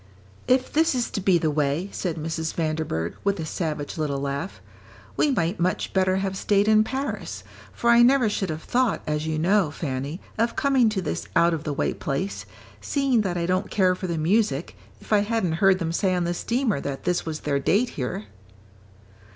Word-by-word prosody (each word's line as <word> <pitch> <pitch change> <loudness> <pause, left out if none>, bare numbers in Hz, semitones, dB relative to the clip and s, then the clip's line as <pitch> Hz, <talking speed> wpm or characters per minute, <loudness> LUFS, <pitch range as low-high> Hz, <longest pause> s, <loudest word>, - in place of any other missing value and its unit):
"If 255 0 +2
this 320 -2 +3
is 245 -2 -1
to 200 - -3
be 185 -1 +4
the 155 -2 0
way," 150 +4 0
said 175 -4 -3
Mrs. 160 +1 -3
Vanderburgh, 155 - -2
with 200 0 0
a 160 - -3
savage 155 -2 -4
little 145 -3 -1
laugh, 140 +6 -4 0.6
"we 300 - +2
might 175 -7 0
much 180 +2 -1
better 185 -1 +2
have 195 0 -1
stayed 200 +1 +2
in 215 0 +5
Paris, 265 +5 -4 0.3
for 235 - +1
I 235 0 +7
never 250 0 +5
should 200 -3 -1
have 155 0 -4
thought, 245 -3 +1
as 150 +1 -2
you 160 -1 -1
know, 185 +1 +3
Fanny, 145 +1 -4 0.2
of 230 +1 +1
coming 265 -5 +3
to 195 -3 -2
this 85 - -3
out 170 0 +4
of 160 -1 -4
the 150 - -1
way - - 0
place, 165 +8 -3 0.3
seeing 275 -5 +1
that 180 -4 -2
I 170 - -1
don't 185 +3 0
care 185 -3 +3
for 185 +1 -5
the 170 -2 -2
music, 165 -2 +1 0.2
if - - -4
I 210 - +6
hadn't 205 -4 0
heard 195 -1 +5
them 165 -3 -2
say 185 +2 +1
on 180 - 0
the 175 0 -1
steamer 235 - -1
that 140 -1 -5
this 180 0 0
was 155 -1 -5
their 140 -1 0
date 205 - +2
here." 125 -5 -4
180 Hz, 200 wpm, -24 LUFS, 155-210 Hz, 0.6 s, I